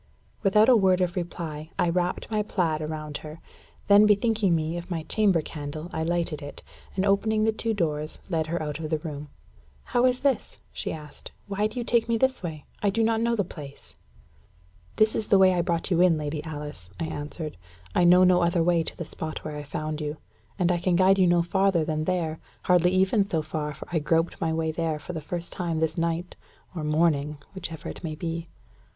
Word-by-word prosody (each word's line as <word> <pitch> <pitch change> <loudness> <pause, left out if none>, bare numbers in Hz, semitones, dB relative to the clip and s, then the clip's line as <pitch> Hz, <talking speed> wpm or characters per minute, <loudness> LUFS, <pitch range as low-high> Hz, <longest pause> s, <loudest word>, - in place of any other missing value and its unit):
Without 210 +1 +5
a 255 - +7
word 190 -4 +4
of 180 0 0
reply, 160 -3 -5
I - - +2
wrapped 180 +4 -1
my 215 -1 +2
plaid 170 -7 0
about 155 -1 -4
her. 155 +1 -10 0.5
Then 205 +1 +7
bethinking 210 -3 +3
me 160 +1 -1
of 175 +1 -6
my 165 -3 -2
chamber 190 -2 +2
candle, 155 +3 -6
I - - -2
lighted 165 -2 -1
it, 145 0 -9 0.3
and 190 +1 +1
opening 215 +2 +2
the 220 - +3
two 220 0 -2
doors, 155 -4 -2
led 160 -4 -1
her 170 +2 -1
out 150 0 -4
of 155 -1 -4
the 155 - +1
room. 150 -2 -7 0.5
"How 245 +1 +2
is 250 0 0
this?" 270 -6 0 0.2
she - - -4
asked. 150 -2 -9
"Why 205 +1 0
do 215 +3 -6
you - - -1
take 235 0 +1
me 230 - +3
this 260 +2 +1
way? 160 -5 -6 0.2
I 205 - +3
do 225 +3 +1
not 225 0 +2
know 235 0 +2
the 205 - +1
place." 145 -5 -11 1.0
"This 215 0 +4
is 215 - -2
the 200 - +5
way 190 -1 +6
I 175 - +2
brought 170 +1 -1
you 175 -1 +4
in, 180 -3 +5
Lady 150 0 -3
Alice," 150 - -7
I 165 - -1
answered. 155 +1 -5 0.4
"I - - +3
know 180 +1 +7
no 180 -1 +5
other 170 0 +2
way 170 0 +3
to 160 - -6
the 170 - -4
spot 155 0 -6
where 155 -1 -4
I 150 - -4
found 155 +1 -4
you. 150 +1 -3 0.4
And 180 -2 +2
I 175 - +1
can 175 0 +1
guide 190 +2 +5
you 185 - +5
no 175 -1 +4
farther 190 -2 +2
than 155 0 -1
there 165 -3 -1 0.2
hardly 180 -1 +4
even 190 +2 +3
so 160 -5 0
far, 150 -1 -3
for - - -10
I 165 - +2
groped 165 +3 0
my 165 - +1
way 160 0 0
there 160 -1 -1
for 165 +4 -8
the 160 - -4
first 170 +3 -5
time 170 -4 -2
this 160 0 0
night 170 +1 -2 0.4
or 160 - -3
morning 150 -1 +1 0.2
whichever 170 -4 -6
it - - -7
may 155 -2 -3
be." 165 +1 -4
170 Hz, 220 wpm, -26 LUFS, 155-190 Hz, 1.0 s, a